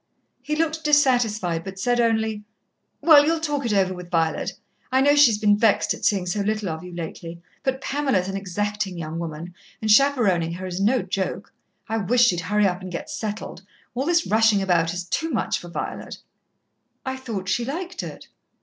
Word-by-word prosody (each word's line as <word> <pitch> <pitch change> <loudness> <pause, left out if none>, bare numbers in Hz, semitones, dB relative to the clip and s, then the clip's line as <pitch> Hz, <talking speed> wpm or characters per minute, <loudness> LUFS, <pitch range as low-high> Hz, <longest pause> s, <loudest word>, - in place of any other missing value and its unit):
He 295 +4 -2
looked 320 0 -1
dissatisfied, 235 - +2
but 195 0 -8
said 240 +5 +1
only: 220 -2 +1 0.6
"Well, 305 -3 +8
you'll 325 +2 +1
talk 295 -5 -2
it 215 - 0
over 190 -2 +2
with 180 -1 -9
Violet. 165 +2 0 0.4
I 260 - +3
know 285 +2 +4
she's 260 -8 +6
been 210 -1 +4
vexed 210 0 +2
at - - -11
seeing 195 -3 +2
so 180 +4 -2
little 215 -1 -1
of 160 +1 -5
you 180 - -9
lately, 170 0 -7 0.2
but 265 0 -2
Pamela's 270 -11 0
an 195 - -4
exacting 195 0 -3
young 165 0 -5
woman, 165 +1 -6 0.3
and 215 -1 0
chaperoning 210 -10 +3
her 185 +2 -6
is 185 +1 -4
no 230 +3 +2
joke. 190 0 -4 0.3
I 225 - -1
wish 230 +4 +2
she'd 180 -8 +2
hurry 205 +4 +1
up 180 -1 0
and 185 -1 -7
get 170 - -6
settled 215 -2 -5 0.3
all 260 +5 -2
this 340 -1 +2
rushing 220 -1 +3
about 170 -3 +2
is 180 +1 -4
too 320 - -2
much 245 - -1
for 175 - -10
Violet." 170 - -5 0.9
"I 260 0 -2
thought 225 -8 -5
she 200 +5 0
liked 350 +8 -4
it." - - -9
210 Hz, 190 wpm, -23 LUFS, 180-260 Hz, 0.9 s, Well